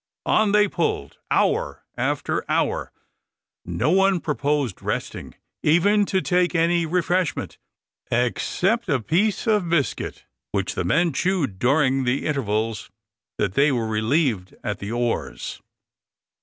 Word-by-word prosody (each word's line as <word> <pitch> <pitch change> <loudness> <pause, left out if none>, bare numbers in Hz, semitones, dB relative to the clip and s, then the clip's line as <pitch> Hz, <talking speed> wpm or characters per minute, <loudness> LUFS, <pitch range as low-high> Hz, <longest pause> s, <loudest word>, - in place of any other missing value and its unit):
On 215 -2 +3
they 210 0 +5
pulled, 165 - -2
hour - - +1
after - - -1
hour. - - 0 0.7
No 155 - 0
one 195 0 +4
proposed 145 - -1
resting, - - -4 0.3
even 200 +6 +3
to 190 - +1
take 180 0 +1
any 170 0 +2
refreshment, 175 -1 -1 0.5
except 185 - 0
a 140 -4 +2
piece 185 - 0
of 210 -6 +2
biscuit, 155 -6 -1 0.3
which - - -1
the - - -2
men 165 - +2
chewed 155 - 0
during 135 +1 +2
the 125 +2 0
intervals 110 -6 -1 0.5
that - - 0
they 140 +6 +4
were 120 -4 -1
relieved 110 - 0
at 105 -3 -3
the 100 +2 -5
oars. 120 0 -3
150 Hz, 125 wpm, -23 LUFS, 120-180 Hz, 0.7 s, they